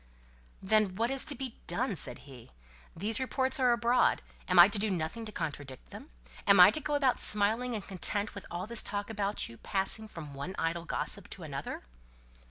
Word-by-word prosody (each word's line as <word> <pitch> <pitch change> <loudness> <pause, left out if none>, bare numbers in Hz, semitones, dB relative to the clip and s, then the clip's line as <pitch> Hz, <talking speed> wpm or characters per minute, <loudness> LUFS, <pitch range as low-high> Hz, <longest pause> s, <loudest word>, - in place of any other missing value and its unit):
"Then, 205 -1 +2
what 230 +5 0
is 270 -1 0
to 300 -2 +1
be 255 -2 -6
done?" 240 -4 -1
said 150 - -2
he. 130 -5 -13 0.5
"These 210 +7 0
reports 260 +1 -1
are 250 -2 +4
abroad, 235 +1 +2 0.2
am 180 - +1
I 175 +1 +10
to 200 0 -1
do 215 +1 +1
nothing 180 +5 -3
to - - -8
contradict 145 -7 -6
them? - - -11 0.4
Am 200 -1 +6
I 180 +3 +10
to 310 - 0
go 295 0 -2
about 270 -3 +2
smiling 225 +4 +2
and 210 - -5
content 200 +2 -1
with 200 - -9
all 175 +2 -5
this 235 +1 +1
talk 205 +1 -4
about 205 -1 -2
you, 115 - -13
passing 195 - +1
from 160 -8 -10
one 140 +8 -6
idle 165 +1 -2
gossip - - -1
to - - -8
another?" - - -6
205 Hz, 195 wpm, -30 LUFS, 175-235 Hz, 0.5 s, I